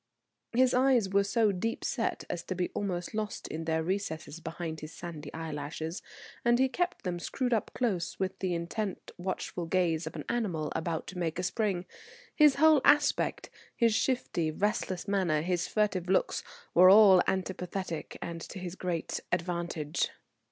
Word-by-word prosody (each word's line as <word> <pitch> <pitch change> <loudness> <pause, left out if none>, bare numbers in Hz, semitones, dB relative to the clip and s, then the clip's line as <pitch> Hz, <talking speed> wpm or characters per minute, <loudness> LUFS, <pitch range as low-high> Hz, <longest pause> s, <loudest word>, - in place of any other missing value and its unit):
His 255 +1 +4
eyes 250 -5 +4
were 200 +1 +3
so 215 +1 +2
deep 210 +5 -2
set 235 -4 -1
as 175 - -3
to 185 - -3
be 180 0 -1
almost 180 -2 -3
lost 215 -1 -3
in 160 +1 -4
their 160 0 0
recesses 170 -4 -3
behind 165 -1 -5
his 155 +1 -8
sandy 160 -5 -7
eyelashes, 160 +1 -5 0.4
and 240 0 +4
he 265 +1 +4
kept 355 +6 -2
them 175 -2 -2
screwed 250 +7 -1
up 220 - 0
close, 200 -9 -1
with 190 0 -2
the 185 -2 0
intent 185 +4 -4
watchful 180 -1 -3
gaze 165 -3 +1
of 160 - -6
an 150 - -6
animal 180 -10 -1
about 160 0 -2
to 180 - -7
make 165 -2 -1
a 180 - -2
spring. 190 -2 0 0.5
His 300 -3 +6
whole 310 -1 +6
aspect, 290 -1 +3 0.2
his 230 -2 +3
shifty, 215 -10 0
restless 190 +1 -1
manner, 180 -7 +1
his 175 0 0
furtive 200 -4 0
looks, 190 - +1 0.3
all 190 +2 +9
were 180 - +4
antipathetic 185 -2 -3
and 165 -1 -5
to - - -8
his 180 -2 -5
great 180 -3 -3
advantage. 170 -3 -1
185 Hz, 165 wpm, -30 LUFS, 170-210 Hz, 0.5 s, all